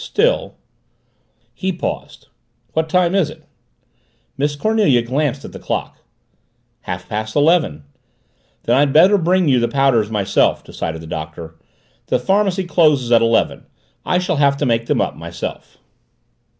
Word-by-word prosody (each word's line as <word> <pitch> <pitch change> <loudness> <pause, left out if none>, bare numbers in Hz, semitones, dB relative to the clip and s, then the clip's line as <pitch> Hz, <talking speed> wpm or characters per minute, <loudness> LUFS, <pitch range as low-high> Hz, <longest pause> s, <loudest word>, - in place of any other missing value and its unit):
"Still 475 +4 0 0.5
" - - -44
He 190 0 0
paused. 175 - -6 0.5
"What 160 0 -1
time 180 +1 +2
is 195 -6 +2
it?" - - -13 0.9
Miss 145 +1 -1
Cornelia 175 - +2
glanced 135 +2 -2
at - - -9
the - - -10
clock. - - -4 0.8
"Half 90 0 -6
past 110 +2 -4
eleven." 150 - +2 0.8
"Then 120 +2 +2
I'd 140 -1 +2
better 185 +6 +6
bring 180 +1 +2
you 130 -3 +4
the 120 - +1
powders 120 -4 +2
myself," 105 -3 +1
decided 80 0 -5
the - - -10
Doctor. 80 +1 -7 0.5
"The - - +2
pharmacy 195 -1 +1
closes 150 -8 +2
at 115 -1 +6
eleven. 115 0 +1 0.4
I 180 - +1
shall 180 -2 -1
have 140 -1 +3
to 145 - -1
make 115 -2 0
them - - +1
up - - -2
myself." - - -7
140 Hz, 150 wpm, -18 LUFS, 115-180 Hz, 0.9 s, better